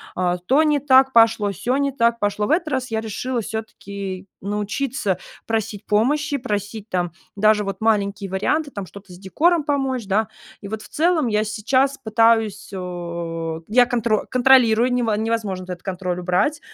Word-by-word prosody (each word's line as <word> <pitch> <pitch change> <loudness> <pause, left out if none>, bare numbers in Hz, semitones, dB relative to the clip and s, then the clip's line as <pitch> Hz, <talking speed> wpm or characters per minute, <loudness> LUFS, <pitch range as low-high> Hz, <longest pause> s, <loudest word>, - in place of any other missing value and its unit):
А 180 -1 0
то 260 - +2
не 300 -2 +2
так 265 -1 +4
пошло, 225 -3 +4
сё 210 +8 -1
не 280 0 0
так 235 -3 +1
пошло. 205 0 0
В - - -1
этот 330 0 +1
раз 260 -3 -2
я 220 0 -1
решила 235 +3 -3
всё-таки 200 -3 -6
научиться 210 +1 -2 0.3
просить 220 -2 -3
помощи, 285 +7 +1
просить 210 -3 -4
там 175 -2 -1 0.2
даже 210 +1 +3
вот 195 -1 -5
маленькие 200 -3 0
варианты, 285 +10 0
там 200 -5 -6
что-то 195 +1 -13
с 175 - -13
декором 315 - +1
помочь, 270 -5 -1
да. 210 +2 +1 0.3
И 200 - -7
вот 215 +1 -5
в - - -13
целом 320 -3 +1
я 210 -1 +1
сейчас 255 +6 0
пытаюсь, 220 -2 +2
а, 170 -3 -5
я 245 +3 +5
контро 235 -4 0
контролирую, 250 -2 +4
нево 240 -3 +1
невозможно 215 -4 -2
этот 180 -1 -7
контроль 180 -2 -3
убрать, 180 - +1
220 Hz, 165 wpm, -21 LUFS, 195-255 Hz, 0.3 s, я